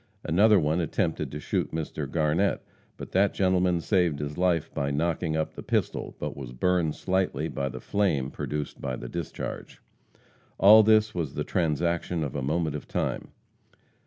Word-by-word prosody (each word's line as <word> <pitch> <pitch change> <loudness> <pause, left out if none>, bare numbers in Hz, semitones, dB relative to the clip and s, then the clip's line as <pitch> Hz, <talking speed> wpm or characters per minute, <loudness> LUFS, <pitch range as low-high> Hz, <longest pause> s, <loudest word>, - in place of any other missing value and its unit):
Another 100 +5 +5
one 80 +1 +1
attempted 80 - -1
to 75 - -5
shoot - - -2
Mr. 75 -3 -4
Garnett, 80 +6 +1 0.3
but - - -8
that 100 +2 +2
gentleman 90 -2 +2
saved 90 -5 +1
his 75 0 -4
life 85 -3 0
by 70 -1 -1
knocking 80 +2 -1
up 80 - -2
the - - -8
pistol, - - -2
but - - -4
was 65 -3 -8
burned 85 +3 +1
slightly 95 0 -1
by 70 0 -3
the 65 0 -7
flame 75 -10 0
produced 75 -1 -5
by 65 -2 -2
the - - -7
discharge. 85 -3 -6 0.8
All 105 +3 +8
this 110 0 +4
was 80 -6 -3
the - - -1
transaction 85 0 0
of 70 - -4
a 70 - -2
moment 75 +2 -1
of 75 - -7
time. - - -2
80 Hz, 165 wpm, -27 LUFS, 75-90 Hz, 0.8 s, All